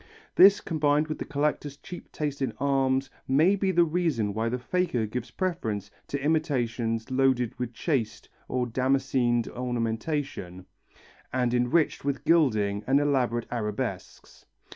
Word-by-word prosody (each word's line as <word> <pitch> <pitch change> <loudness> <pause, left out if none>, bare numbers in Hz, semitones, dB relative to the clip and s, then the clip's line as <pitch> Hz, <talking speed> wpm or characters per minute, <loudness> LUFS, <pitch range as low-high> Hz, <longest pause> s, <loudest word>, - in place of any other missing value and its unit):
This 195 +2 +7
combined 150 -1 +1
with 155 - -4
the - - -4
collector's 145 -1 -2
cheap 175 +5 -10
taste 145 -2 -3
in 130 -5 -1
arms 135 0 +1 0.2
may 155 +9 +4
be 195 -1 0
the 175 -1 +4
reason 155 - 0
why 110 +2 -1
the 125 - -1
faker 130 -3 -1
gives 120 +3 -5
preference 110 - -3 0.2
to 140 - -3
imitations 125 -6 -1
loaded 130 -3 +2
with 125 -1 -3
chased 115 -5 -2 0.2
or 125 -1 -1
damascened 125 -1 +1
ornamentation, 115 - -3 0.7
and 125 -2 0
enriched 125 +7 +1
with 140 +1 -2
gilding 110 -11 +2
and 135 +2 +4
elaborate 125 -5 +1
arabesques. 105 -4 -5
130 Hz, 135 wpm, -27 LUFS, 115-150 Hz, 0.7 s, This